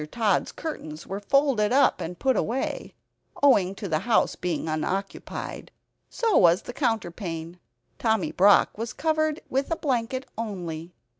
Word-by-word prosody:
Tod's 215 -5 +1
curtains 160 - -6
were 195 +1 -4
folded 240 -1 +2
up, 275 +1 +4
and 175 +2 -5
put 265 -1 +2
away, 250 +4 -2 0.5
owing 195 -9 +4
to 200 0 -5
the 155 -3 0
house 230 +5 +2
being 175 -2 -3
unoccupied. 185 +5 -4 0.4
So 455 -4 0
was 175 0 +5
the 245 - -7
counterpane. 175 - -3 0.4
Tommy 220 -4 +1
Brock 200 +2 +5
was 230 0 -3
covered 310 0 0
with 270 +2 -1
a 330 - +1
blanket 260 -3 -1
only.) 175 -6 -5
215 Hz, 140 wpm, -26 LUFS, 180-265 Hz, 0.5 s, was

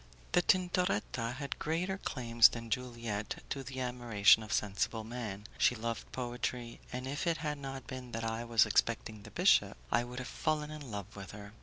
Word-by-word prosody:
The 180 - +5
Tintoretta 175 - +1
had 140 0 -5
greater 180 +5 -1
claims 120 -7 +5
than 115 -1 -7
Juliette 115 -4 -3
to 140 - -1
the 130 0 -5
admiration 120 -5 +4
of 110 0 -8
sensible 105 +2 0
men. 110 -3 -5
She 125 - +5
loved 115 0 -4
poetry, 120 -1 -3
and 125 +1 -4
if 145 +6 -2
it 165 -1 +2
had 150 -2 -3
not 135 -2 -6
been 130 -2 -7
that 115 0 -2
I 115 +1 -2
was 115 -1 +5
expecting 110 0 +1
the - - -11
bishop, - - +4
I 120 +1 +3
would 125 0 -8
have 130 - -4
fallen 155 -1 -1
in 150 -4 -7
love 100 -1 -6
with 100 -1 -8
her. 100 0 -9
120 Hz, 185 wpm, -33 LUFS, 110-135 Hz, -, The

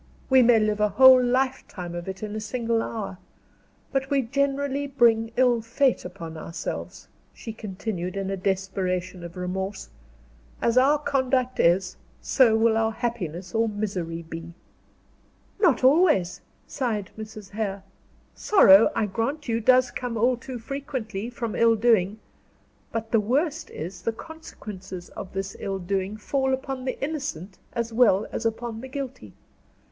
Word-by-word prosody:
We 260 -1 +7
may 240 -1 +6
live 215 -1 0
a 210 0 +3
whole 255 +4 +8
lifetime 250 -8 -1
of 175 +1 -6
it 190 +2 -6
in 210 0 -4
a - - -2
single 230 +1 -1
hour. 205 -6 -5 0.7
But 270 -1 -1
we 280 -2 +2
generally 280 +2 -1
bring 230 -4 +3
ill 245 -2 +4
fate 240 +3 +1
upon 170 -3 -8
ourselves," 165 +2 -6 0.3
she 225 - -7
continued, 195 -3 -5
in 195 0 -2
a - - -1
desperation 185 -1 -2
of 170 +1 -9
remorse; 190 +2 -4 0.7
"as 235 - +1
our 270 +4 +5
conduct 260 -3 0
is, 180 +2 +2 0.2
so 235 -5 +4
will 225 0 +3
our 225 0 +2
happiness 190 - -4
or 225 0 +2
misery 185 -6 -3
be." 165 +1 -8 1.0
"Not 365 -9 +3
always," 265 - +4 0.2
sighed 220 -7 -3
Mrs. 215 -2 -9
Hare. 200 -2 -3 0.5
"Sorrow, 215 - +6
I 220 - +1
grant 235 +9 -3
you, 230 -1 0
does 255 +2 +4
come 245 -2 -4
all 245 +3 +3
too 250 +1 -7
frequently, 240 -5 -5
from 230 -2 -4
ill 230 0 +4
doing; 215 -3 +2 0.7
but 225 0 -4
the 225 - +4
worst 290 +9 0
is, 175 +3 -7
the 230 - -1
consequences 205 - -9
of 195 - -9
this 195 0 -4
ill 195 -1 -3
doing 190 +2 -2
fall 265 +4 0
upon 265 -1 -6
the 255 - -3
innocent 270 - -4
as 235 -1 -3
well 220 -4 +4
as 225 - -1
upon 225 0 -4
the 260 - -7
guilty. 260 - -7
225 Hz, 150 wpm, -25 LUFS, 195-255 Hz, 1.0 s, whole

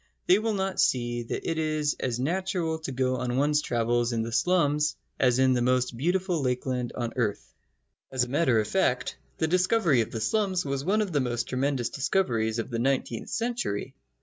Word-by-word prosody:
They 185 +3 +5
will 220 -1 -1
not 190 -1 -2
see 120 -1 +1
that 115 - -5
it 165 -1 -1
is 155 -2 0
as 125 -2 -2
natural 170 +2 -1
to 155 -4 -5
go 130 0 0
on 125 0 -2
one's 150 +2 +3
travels 120 -1 0
in 115 -1 0
the 115 - -5
slums 150 0 +2 0.2
as 125 -2 +3
in 130 0 +4
the 125 - +1
most 125 0 +1
beautiful 175 +4 0
lakeland 125 -1 -1
on 120 -2 -3
earth. 110 -5 -2 0.6
As 130 -2 +1
a - - -3
matter 130 -3 +2
of 105 - -1
fact, - - 0 0.2
the - - +1
discovery 180 - +3
of 110 - -3
the 115 - -4
slums 185 - 0
was 140 -1 -2
one 210 +6 +2
of 200 - -5
the 150 - +1
most 120 -1 -2
tremendous 130 -2 0
discoveries 120 -8 0
of 115 +3 -4
the 115 - -2
nineteenth 125 -2 -1
century. 235 - -2
130 Hz, 195 wpm, -27 LUFS, 120-170 Hz, 0.6 s, They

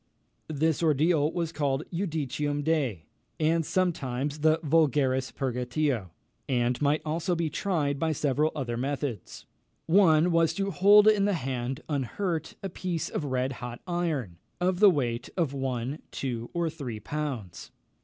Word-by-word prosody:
This 155 +1 0
ordeal 155 0 +3
was 170 -2 -2
called 145 -3 0
the - - -6
Judicium 145 -1 -2
Dei, 135 - 0 0.3
and 165 +1 +2
sometimes 150 -5 -1
the 155 +1 +4
Vulgaris 140 -4 +2
Purgatio, 125 - -1 0.4
and 125 0 +1
might 145 +1 +2
also 165 +3 -1
be 165 -2 -1
tried 150 -8 -1
by 160 +1 +1
several 150 +1 +1
other 120 -5 -3
methods. 130 -4 -4 0.4
One 170 -2 +5
was 165 -1 +3
to 195 +1 -1
hold 205 +3 +6
in 210 -2 +5
the 205 - +2
hand, 130 -1 -3
unhurt, 160 - -2
a 195 - -2
piece 175 -2 -3
of 150 - -3
red 130 -1 -1
hot 120 -1 -6
iron, 155 - -2 0.2
of 180 0 +1
the 210 -1 +8
weight 125 -7 -1
of 160 -6 0
one, 135 +1 -3
two, 120 -3 -4
or 170 -1 -1
three 140 -9 -5
pounds. 130 - -5
150 Hz, 145 wpm, -28 LUFS, 130-165 Hz, 0.4 s, the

